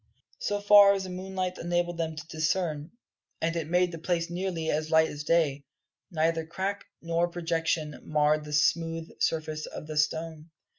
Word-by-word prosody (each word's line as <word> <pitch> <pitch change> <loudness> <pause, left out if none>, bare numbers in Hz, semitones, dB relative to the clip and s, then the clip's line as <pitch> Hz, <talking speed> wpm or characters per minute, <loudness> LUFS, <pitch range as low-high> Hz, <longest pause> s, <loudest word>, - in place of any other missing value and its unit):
So 205 0 -1
far 205 -1 +8
as 195 -1 -2
the 185 - -6
moonlight 185 0 -4
enabled 175 0 -1
them 160 -1 -2
to 160 +2 -8
discern 160 -1 -1 0.5
and 165 +1 -1
it 160 -2 -3
made 180 +1 +2
the 165 - -7
place 170 0 -1
nearly 175 -3 -2
as 155 +1 -1
light 160 0 +4
as 150 0 -6
day 150 -4 +2 0.5
neither 165 -1 +1
crack 190 +5 -4 0.2
nor 170 +1 +1
projection 165 -3 -2
marred 150 0 +2
the 150 0 -7
smooth 165 +2 +1
surface 155 -1 -1
of - - -8
the 155 0 -6
stone. 160 +1 -1
165 Hz, 165 wpm, -28 LUFS, 155-175 Hz, 0.5 s, far